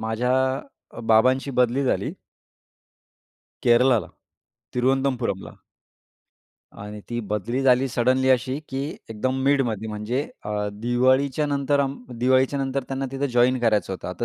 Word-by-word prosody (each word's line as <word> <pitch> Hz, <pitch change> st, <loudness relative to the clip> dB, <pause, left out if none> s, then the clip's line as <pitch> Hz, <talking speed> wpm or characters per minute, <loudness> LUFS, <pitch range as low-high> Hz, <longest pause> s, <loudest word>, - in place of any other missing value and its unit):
माझ्या 110 Hz, +3 st, -1 dB, 0.6 s
अ, -, -, -7 dB
बाबांची 125 Hz, +5 st, +3 dB
बदली 125 Hz, +1 st, +2 dB
झाली -, -, 0 dB, 1.5 s
केरळाला 120 Hz, -4 st, +4 dB, 0.7 s
तिरुवनंतपुरमला. 130 Hz, -5 st, 0 dB, 1.3 s
आणि 105 Hz, +1 st, -8 dB
ती 120 Hz, -, -2 dB
बदली 110 Hz, +5 st, -1 dB
झाली 130 Hz, 0 st, +4 dB
सडनली 130 Hz, +2 st, +1 dB
अशी 130 Hz, +2 st, +1 dB
की 135 Hz, 0 st, -3 dB, 0.3 s
एकदम 130 Hz, +4 st, -2 dB
मिडमध्ये 120 Hz, -6 st, +1 dB
म्हणजे 110 Hz, +5 st, -2 dB, 0.2 s
अ, 105 Hz, 0 st, -2 dB
दिवाळीच्या 130 Hz, +6 st, +1 dB
नंतर 140 Hz, 0 st, +1 dB
अम 140 Hz, 0 st, -1 dB, 0.2 s
दिवाळीच्यानंतर 130 Hz, +2 st, +1 dB
त्यांना 135 Hz, 0 st, -2 dB
तिथं 140 Hz, +1 st, -1 dB
जॉइन 125 Hz, +1 st, +3 dB
करायचं 105 Hz, -5 st, +1 dB
होतं. 90 Hz, -, -6 dB
आता 90 Hz, -1 st, -4 dB
125 Hz, 120 wpm, -24 LUFS, 110-135 Hz, 1.5 s, केरळाला